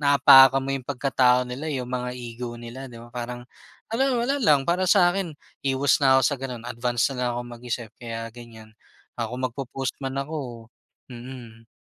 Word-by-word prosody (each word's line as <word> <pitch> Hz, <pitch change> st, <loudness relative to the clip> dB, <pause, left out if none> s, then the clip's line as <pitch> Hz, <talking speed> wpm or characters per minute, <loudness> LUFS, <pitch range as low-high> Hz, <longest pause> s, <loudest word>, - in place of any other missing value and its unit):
naapakan 135 Hz, -2 st, +7 dB
mo 135 Hz, -, -2 dB
yung 135 Hz, -2 st, -4 dB
pagkatao 125 Hz, -2 st, +2 dB
nila 125 Hz, +5 st, -5 dB
yung 130 Hz, -4 st, -4 dB
mga 125 Hz, 0 st, -2 dB
ego 120 Hz, 0 st, -7 dB
nila 120 Hz, +3 st, -8 dB
di 120 Hz, -, -12 dB
ba? 120 Hz, +1 st, -13 dB
Parang, 120 Hz, 0 st, -6 dB, 0.5 s
ano 260 Hz, +1 st, +2 dB
wala 280 Hz, +2 st, 0 dB
lang 145 Hz, -, +4 dB
para 180 Hz, +2 st, +1 dB
sakin 175 Hz, -4 st, +3 dB, 0.3 s
iwas 135 Hz, +1 st, +2 dB
na 135 Hz, -1 st, +6 dB
ako -, -, +3 dB
sa -, -, +1 dB
ganun 125 Hz, -3 st, -6 dB
advance 120 Hz, 0 st, 0 dB
na -, -, -7 dB
lang 125 Hz, -, +1 dB
ako -, -, -2 dB
mag-isip 120 Hz, -1 st, -5 dB
kaya 115 Hz, -1 st, -5 dB
ganyan, 115 Hz, -2 st, -13 dB, 0.4 s
ah, 115 Hz, -1 st, -3 dB
kung 125 Hz, +1 st, -4 dB
mag-popost 130 Hz, +1 st, -4 dB
man 135 Hz, 0 st, -3 dB
ako 135 Hz, -6 st, -5 dB, 0.5 s
mm. 120 Hz, -2 st, -10 dB
125 Hz, 180 wpm, -25 LUFS, 120-135 Hz, 0.5 s, naapakan